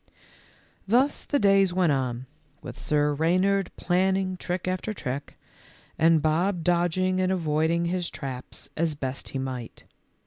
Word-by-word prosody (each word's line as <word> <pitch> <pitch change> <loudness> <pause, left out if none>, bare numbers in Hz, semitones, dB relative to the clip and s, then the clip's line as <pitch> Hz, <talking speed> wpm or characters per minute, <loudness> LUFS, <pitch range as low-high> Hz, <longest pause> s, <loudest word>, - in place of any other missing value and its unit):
Thus 255 +7 +2
the 290 - +1
days 195 -5 +4
went 180 -4 +3
on, 130 -2 -1 0.4
with - - -7
Sir 150 -1 +1
Reynard 185 +5 +2
planning 190 +1 +1
trick 180 0 -4
after 185 +4 -2
trick, 140 -1 -5 0.6
and 160 -1 +4
Bob 170 +3 +1
dodging 175 +2 +1
and 185 0 +1
avoiding 165 -1 +1
his 175 0 -1
traps 130 -2 -7
as 160 -1 0
best 135 -2 -5
he - - -4
might. 130 -3 -5
170 Hz, 135 wpm, -26 LUFS, 150-185 Hz, 0.6 s, days